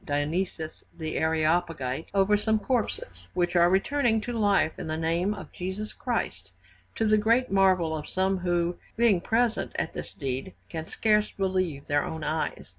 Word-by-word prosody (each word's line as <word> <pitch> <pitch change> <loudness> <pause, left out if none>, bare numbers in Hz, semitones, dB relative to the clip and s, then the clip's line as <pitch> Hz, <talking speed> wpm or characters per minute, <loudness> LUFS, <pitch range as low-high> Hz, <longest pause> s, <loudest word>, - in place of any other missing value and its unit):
Dionysius 155 +3 -2
the 160 -2 -4
Areopagite 160 -3 0
over 195 +1 +4
some 220 +1 +2
corpses, 205 - -2
which 175 0 +1
are 175 0 +6
returning 225 +4 +2
to 245 - -4
life 205 -7 +2
in - - -5
the 155 0 -2
name 170 +5 0
of - - -9
Jesus 190 +4 -5
Christ, - - -3 0.4
to 225 - 0
the 215 0 +4
great 230 +3 +2
marvel 185 -4 +3
of 150 - -6
some 190 0 +1
who, 175 -1 0 0.2
being 220 -6 +4
present 230 +2 +1
at - - -2
this - - -6
deed, 135 +4 -4
can 160 -1 -5
scarce 210 -1 +2
believe 185 -7 -1
their 145 0 +1
own 160 -1 -5
eyes. 155 +1 -2
180 Hz, 165 wpm, -27 LUFS, 160-210 Hz, 0.4 s, are